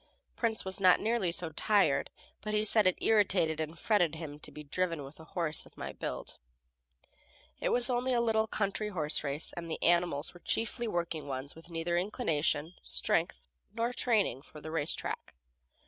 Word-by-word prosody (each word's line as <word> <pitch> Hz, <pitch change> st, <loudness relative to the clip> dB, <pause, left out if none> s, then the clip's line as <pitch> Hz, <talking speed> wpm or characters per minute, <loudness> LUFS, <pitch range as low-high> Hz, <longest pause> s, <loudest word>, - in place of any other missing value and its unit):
Prince 225 Hz, -4 st, 0 dB
was 190 Hz, +1 st, -1 dB
not 185 Hz, -2 st, +6 dB
nearly 220 Hz, -6 st, +1 dB
so 170 Hz, -1 st, -1 dB
tired, 195 Hz, -3 st, +2 dB, 0.3 s
but 215 Hz, +1 st, -2 dB
he 210 Hz, 0 st, +2 dB
said 215 Hz, -2 st, +5 dB
it 185 Hz, -, +3 dB
irritated 190 Hz, -7 st, +3 dB
and 160 Hz, +1 st, -3 dB
fretted 175 Hz, -8 st, +2 dB
him 150 Hz, -2 st, -7 dB
to -, -, -7 dB
be 150 Hz, -, -9 dB
driven 165 Hz, +1 st, -1 dB
with 140 Hz, +3 st, -12 dB
a 160 Hz, -, -11 dB
horse 165 Hz, -3 st, 0 dB
of -, -, -22 dB
my -, -, -5 dB
build. 65 Hz, -, -5 dB, 1.2 s
It -, -, 0 dB
was 245 Hz, 0 st, +2 dB
only 250 Hz, 0 st, 0 dB
a 245 Hz, -, +3 dB
little 220 Hz, -2 st, +2 dB
country 210 Hz, 0 st, -1 dB
horse 155 Hz, -7 st, +2 dB
race, 145 Hz, +2 st, -2 dB
and 170 Hz, -1 st, -6 dB
the 160 Hz, -, -4 dB
animals 170 Hz, -3 st, +2 dB
were 175 Hz, -, -13 dB
chiefly 230 Hz, +5 st, -1 dB
working 170 Hz, -6 st, -2 dB
ones 135 Hz, +1 st, -5 dB
with 165 Hz, +1 st, -14 dB
neither 170 Hz, +1 st, 0 dB
inclination, 165 Hz, -, 0 dB
strength 170 Hz, +2 st, 0 dB, 0.3 s
nor 235 Hz, +2 st, 0 dB
training 215 Hz, -, +2 dB
for 155 Hz, +1 st, -13 dB
the 155 Hz, +1 st, -7 dB
race 160 Hz, -2 st, +1 dB
track. -, -, -5 dB
175 Hz, 180 wpm, -32 LUFS, 155-215 Hz, 1.2 s, not